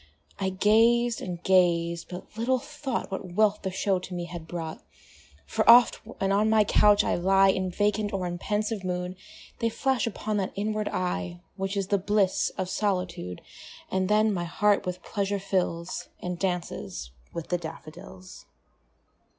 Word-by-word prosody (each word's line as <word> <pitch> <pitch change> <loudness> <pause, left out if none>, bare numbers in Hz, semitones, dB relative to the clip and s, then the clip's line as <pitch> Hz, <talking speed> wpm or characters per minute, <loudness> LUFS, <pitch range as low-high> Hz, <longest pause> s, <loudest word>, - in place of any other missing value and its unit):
I 190 -1 0
gazed 230 +5 +3
and 175 -2 -6
gazed 170 -2 +2
but 180 +3 -9
little 240 +4 +1
thought 280 -4 -4
What 190 -2 -5
wealth 210 +1 +3
the 190 - -2
show 190 0 0
to 180 0 -8
me 175 -1 -3
had 170 -2 -8
brought; 165 -2 -5 0.6
For 70 - 0
oft, 240 +1 +8
when 195 0 -3
on 210 +2 +3
my 220 -1 +5
couch 205 0 +5
I - - 0
lie 195 +2 +4
In 185 -1 +1
vacant 205 +2 0
or 190 -2 -2
in 175 0 -4
pensive 210 0 -2
mood, 180 0 -3 0.4
They 230 - +1
flash 260 +1 0
upon 215 -1 -2
that 195 -2 -2
inward 215 +1 -1
eye 180 -1 -2 0.2
Which 195 +1 -3
is 195 -1 -2
the 200 - +2
bliss 200 0 +2
of 185 - -1
solitude; 180 - -2 0.5
And 190 0 0
then 215 0 +3
my 175 -2 -2
heart 200 +3 +2
with 180 0 -4
pleasure 200 0 -1
fills, 185 -3 -2
And 180 -1 -4
dances 165 - -3 0.2
with 170 - -6
the 175 - 0
daffodils. 170 +3 -10
190 Hz, 165 wpm, -27 LUFS, 180-210 Hz, 0.6 s, oft